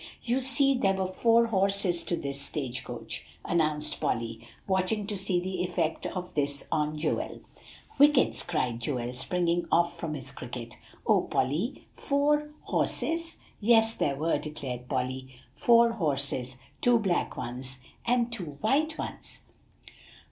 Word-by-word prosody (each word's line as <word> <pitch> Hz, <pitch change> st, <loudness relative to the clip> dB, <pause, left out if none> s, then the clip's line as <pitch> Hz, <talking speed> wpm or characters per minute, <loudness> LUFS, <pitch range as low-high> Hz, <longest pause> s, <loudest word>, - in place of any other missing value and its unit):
"You 245 Hz, +2 st, +1 dB
see, 275 Hz, +1 st, +5 dB
there 195 Hz, -7 st, +2 dB
were 190 Hz, 0 st, 0 dB
four 230 Hz, +5 st, +4 dB
horses 195 Hz, -4 st, +2 dB
to 175 Hz, -, 0 dB
this 140 Hz, -3 st, -4 dB
stage 130 Hz, -4 st, -3 dB
coach," -, -, -5 dB, 0.2 s
announced 155 Hz, -3 st, 0 dB
Polly, 115 Hz, 0 st, -2 dB, 0.2 s
watching 190 Hz, +2 st, +1 dB
to 205 Hz, 0 st, -3 dB
see 190 Hz, -2 st, +1 dB
the 185 Hz, 0 st, -3 dB
effect 165 Hz, -3 st, -1 dB
of 180 Hz, -1 st, -5 dB
this 145 Hz, -1 st, -1 dB
on 150 Hz, 0 st, 0 dB
Joel. 155 Hz, +1 st, -2 dB, 0.6 s
"Whickets!" 290 Hz, -1 st, +5 dB
cried 125 Hz, -9 st, -1 dB
Joel, 120 Hz, -1 st, -2 dB
springing 170 Hz, +5 st, 0 dB
off 170 Hz, 0 st, +2 dB
from 155 Hz, -2 st, -3 dB
his 135 Hz, -4 st, -7 dB
cricket. 120 Hz, -1 st, -8 dB, 0.3 s
"O -, -, +4 dB
Polly 155 Hz, -, -1 dB
four 295 Hz, +1 st, +1 dB
horses!" 330 Hz, 0 st, -1 dB, 0.2 s
"Yes, 225 Hz, 0 st, +5 dB
there 140 Hz, -10 st, 0 dB
were," 160 Hz, +4 st, +1 dB
declared 130 Hz, -5 st, -6 dB
Polly, 130 Hz, 0 st, -2 dB, 0.3 s
"four 235 Hz, 0 st, +5 dB
horses, 140 Hz, -, -1 dB, 0.2 s
two 245 Hz, -1 st, +5 dB
black 195 Hz, -6 st, 0 dB
ones 130 Hz, +2 st, -6 dB, 0.3 s
and 240 Hz, 0 st, +1 dB
two 165 Hz, -10 st, -5 dB
white 305 Hz, +8 st, +1 dB
ones." -, -, -6 dB
175 Hz, 140 wpm, -29 LUFS, 140-225 Hz, 0.6 s, see